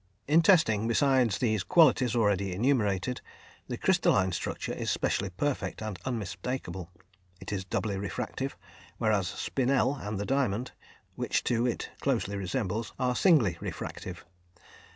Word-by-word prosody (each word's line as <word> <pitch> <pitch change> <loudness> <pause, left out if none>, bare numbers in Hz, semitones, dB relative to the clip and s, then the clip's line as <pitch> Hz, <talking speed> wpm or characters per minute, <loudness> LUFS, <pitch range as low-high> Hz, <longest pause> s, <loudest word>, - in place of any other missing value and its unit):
In 155 +4 +5
testing, 155 - +4
besides 130 -2 +3
those 110 -5 +1
qualities 130 - +4
already 100 -4 +1
enumerated, 110 -1 +1 0.5
the - - -4
crystalline 95 -2 +3
structure 85 - -3
is - - -3
specially 100 - 0
perfect 135 +10 -2
and 110 -5 -5
unmistakable. 115 -4 -4 0.5
It - - -6
is 95 -2 -3
doubly 100 +1 -2
refractive, 95 -4 -4 0.4
whereas 105 -4 +1
spinel 135 +7 0
and 105 -4 -4
the 100 - -2
diamond, 125 -3 0 0.4
which - - -1
two 120 0 +1
it 120 - -3
closely 100 - 0
resembles, 105 +3 -2
are 125 -1 0
singly 125 - +4
refractive. 90 -2 -6
110 Hz, 130 wpm, -29 LUFS, 100-130 Hz, 0.5 s, In